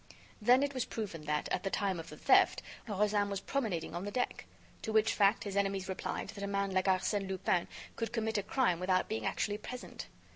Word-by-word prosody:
Then 250 +5 +6
it 285 0 -1
was 255 -2 0
proven 185 -9 -5
that, 150 0 0
at - - 0
the 195 - -1
time 195 -3 0
of 165 - -8
the - - -10
theft, - - +4 0.2
Rozaine 205 0 +1
was 200 -1 -2
promenading 200 - -2
on 175 +2 -3
the 205 - -3
deck. 250 +3 -2 0.3
To 220 - -3
which 220 0 +4
fact, 200 +1 +3
his 200 -2 -4
enemies 195 -1 0
replied 190 - -3
that 200 - -7
a - - -1
man 200 0 0
like 185 0 +1
Arsène 195 +1 +1
Lupin 190 -2 +1 0.3
could 230 -1 -3
commit 220 -2 0
a - - 0
crime 200 -4 +1
without 185 0 +2
being 220 - -2
actually 205 0 -1
present. 250 +3 -7
200 Hz, 215 wpm, -33 LUFS, 190-220 Hz, 0.3 s, Then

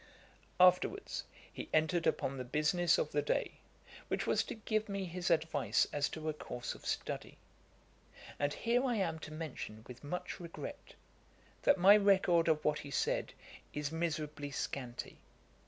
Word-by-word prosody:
] - - -31
Afterwards 400 - -4 0.3
he - - -6
entered 160 +2 +2
upon 135 - 0
the - - -2
business 155 +6 +2
of 150 - -1
the 145 - +2
day, 145 - -1 0.5
which - - -1
was - - +3
to - - -5
give 215 0 -1
me 195 -1 -2
his 175 0 -3
advice 160 0 +2
as 145 -1 +1
to 160 0 -6
a 155 - +1
course 125 -4 -5
of - - -11
study. - - -3 1.0
And 145 0 +1
here 235 - +1
I 250 -3 +1
am 170 -6 -1
to 155 - -8
mention 155 -8 -6
with 125 +1 -11
much 180 +5 -4
regret, 170 -2 -8 0.7
that 285 - +4
my 195 +3 +8
record 190 -5 +4
of 155 -2 +2
what 150 0 +2
he 145 - -8
said 140 - 0 0.4
is 145 0 -2
miserably 155 -3 -2
scanty. 130 -3 -5
160 Hz, 160 wpm, -34 LUFS, 145-180 Hz, 1.0 s, my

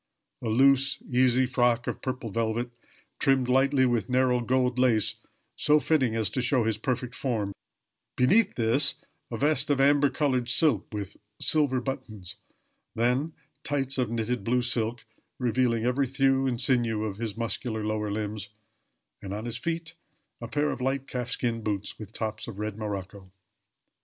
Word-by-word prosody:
A 120 - -4
loose, 135 +3 +4
easy 130 +1 +4
frock 125 -2 +1
of - - -4
purple 125 -4 -4
velvet, 115 +2 -1 0.5
trimmed 135 -3 +2
lightly 135 +1 +3
with 120 -5 0
narrow 125 -1 +3
gold 125 +1 +1
lace, 120 -5 +3 0.4
so 150 0 +4
fitting 135 -7 +1
as 110 -2 +2
to 130 - -1
show 125 0 +2
his 110 -1 -1
perfect 125 +1 -2
form; 110 -7 -2 0.6
beneath 195 - +4
this 115 +4 +4 0.3
a - - -4
vest 145 0 +2
of 145 -2 +2
amber 145 +1 +4
colored 130 -5 0
silk, 155 +4 +2
with 100 -2 -6 0.2
silver 145 -5 +3
buttons; 120 -8 -6 0.6
then 125 +7 +1 0.3
tights 140 -3 -1
of 125 -3 +1
knitted 115 -1 -2
blue 125 +3 +1
silk, 120 -1 -1 0.3
revealing 120 -2 +1
every 130 +2 +1
thew 135 0 +2
and 120 -2 -1
sinew 120 -4 +1
of 100 -3 -4
his 110 -2 -4
muscular 115 -1 -2
lower 105 0 -1
limbs; 105 -1 -4 0.7
and 100 0 -5
on 110 +2 -5
his 120 -1 -3
feet 165 +2 -3 0.5
a 115 - -5
pair 145 +4 0
of - - -5
light 135 +1 -1
calf 125 -2 -4
skin 120 -3 -1
boots, 105 -2 -3
with 105 -2 -9
tops 110 -1 -4
of 115 -5 -8
red 105 0 -3
morocco. 100 -3 -6
125 Hz, 160 wpm, -27 LUFS, 110-135 Hz, 0.7 s, loose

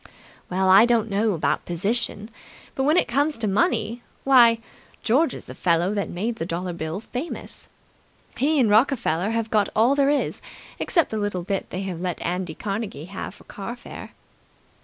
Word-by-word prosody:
"Well, 190 +1 +1
I 195 +5 +7
don't 225 -3 +2
know 210 +2 +2
about 165 - 0
position, 210 +4 -2 0.4
but 265 - -1
when 305 +4 +4
it - - +3
comes 285 +5 +1
to 225 -2 -2
money 210 +3 +1 0.2
why, 240 -4 +6 0.5
George 265 +5 +2
is - - -10
the - - -9
fellow 175 +2 +1
that 200 -2 -2
made 220 +6 -3
the 165 - -3
dollar 180 +1 -3
bill 160 +2 -4
famous. 250 +8 -6 0.7
He 300 +3 +2
and 245 - +4
Rockefeller 210 - +2
have 225 -1 -2
got 210 -2 +2
all 230 +5 +4
there 280 -1 +3
is, 290 -1 0 0.4
except 335 -5 +1
the 220 - -2
little 205 -4 -2
bit 195 +1 -3
they 185 +2 -4
have 180 -3 -5
let 180 -2 -2
Andy 180 -2 -2
Carnegie 195 -7 -4
have 200 - -6
for - - -17
car 210 +4 -7
fare." 245 - -10
215 Hz, 180 wpm, -24 LUFS, 185-240 Hz, 0.7 s, I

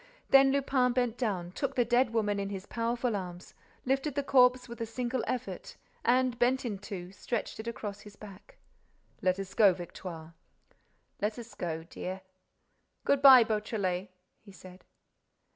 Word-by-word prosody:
Then 270 0 +7
Lupin 265 -2 +2
bent 245 -2 0
down, 190 -8 -2
took 275 +7 -3
the 245 - +2
dead 240 +1 +2
woman 210 -3 0
in 200 0 -3
his 195 -1 -6
powerful 235 +1 -1
arms, 180 -2 -7 0.3
lifted 270 +2 0
the 285 - 0
corpse 250 -2 +4
with 235 -1 -9
a - - 0
single 245 +1 -2
effort 255 - -5 0.3
and, 250 0 +2
bent 255 +2 +2
in 205 -5 -3
two, 185 -3 -7
stretched 220 +3 -4
it 220 - -6
across 205 -3 -5
his 205 -1 -13
back: 200 -1 -14 0.6
"Let 185 0 +2
us 195 -1 -6
go, 205 -4 +6
Victoire." 170 -2 -8 0.9
"Let 210 +2 -1
us 235 -1 -9
go, 165 -2 -4
dear." 185 +3 -6 0.8
"Good 280 -1 +2
bye, 265 -3 +10
Beautrelet," 210 -4 -2 0.3
he 205 - -14
said. 185 -1 -14
225 Hz, 160 wpm, -30 LUFS, 195-250 Hz, 0.9 s, bye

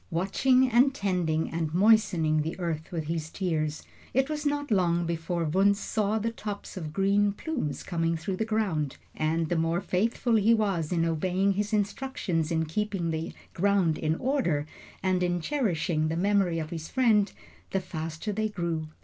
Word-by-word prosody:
Watching 250 +9 +3
and 255 +3 +4
tending 175 - 0
and 160 -1 -2
moistening 180 -7 +4
the 160 +4 -4
earth 165 -3 -3
with 165 -3 -2
his 155 0 -3
tears, 155 -5 -2 0.3
it 265 +2 +2
was 300 -1 -1
not 290 -2 -2
long 175 -3 +2
before 170 +1 -2
Wunzh 195 +6 +3
saw 215 0 0
the 225 +1 -1
tops 210 -3 -6
of 160 -5 -5
green 200 +3 +2
plumes 245 - -3
coming 165 -2 -1
through 185 +4 -3
the 220 - 0
ground; 200 -10 -1 0.2
and 160 +1 0
the 175 - 0
more 165 +1 +1
faithful 225 +5 +1
he 220 +2 +5
was 195 -8 0
in 165 -2 +2
obeying 185 +4 +1
his 205 +2 -1
instructions 205 - -1
in 160 -1 +1
keeping 185 0 -2
the 160 0 -3 0.2
ground 190 -4 +2
in 155 0 0
order 180 - 0 0.4
and 185 -1 +1
in 175 0 +1
cherishing 170 - 0
the 160 +1 -2
memory 195 -2 +2
of 155 -1 -4
his 160 -2 -5
friend, 220 -6 +3 0.4
the 195 - 0
faster 165 +2 -5
they 215 +1 -1
grew. 170 -5 -2
180 Hz, 170 wpm, -28 LUFS, 165-210 Hz, 0.4 s, he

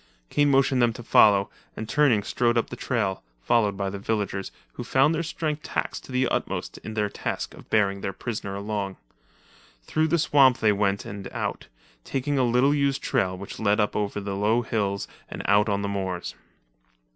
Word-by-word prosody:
Kane 145 0 +3
motioned 135 -2 +3
them 120 -1 +3
to 120 - -9
follow, 100 -3 +5 0.3
and 110 - -5
turning 125 -4 +3
strode 120 +2 +1
up 115 - 0
the - - -4
trail, 115 -6 -1 0.2
followed 105 - +1
by 100 0 -2
the 100 - -6
villagers, 100 -2 -2 0.2
who - - -6
found 135 +4 +3
their 165 - 0
strength 155 -2 -3
taxed - - -3
to - - -12
the 130 0 +2
utmost - - -3
in 110 - -8
their 105 -1 +1
task - - -4
of - - -15
bearing 100 -2 +2
their 95 - -2
prisoner 100 -1 -5
along. 100 -1 -3 0.9
Through 155 - +1
the 170 - +2
swamp 140 -5 +5
they 110 - +3
went 100 -1 0
and 100 -1 -7
out, - - -4 0.4
taking 140 - -1
a - - +3
little 125 +4 +3
used 140 -2 0
trail 95 -9 0
which 100 +1 -8
led 105 0 +2
up 105 - +1
over 105 0 -1
the 100 -1 -4
low 110 +4 +2
hills 100 -3 -1 0.2
and - - -6
out 105 +2 +4
on 100 0 0
the - - -1
moors. 95 -3 -3
110 Hz, 190 wpm, -25 LUFS, 100-130 Hz, 0.9 s, follow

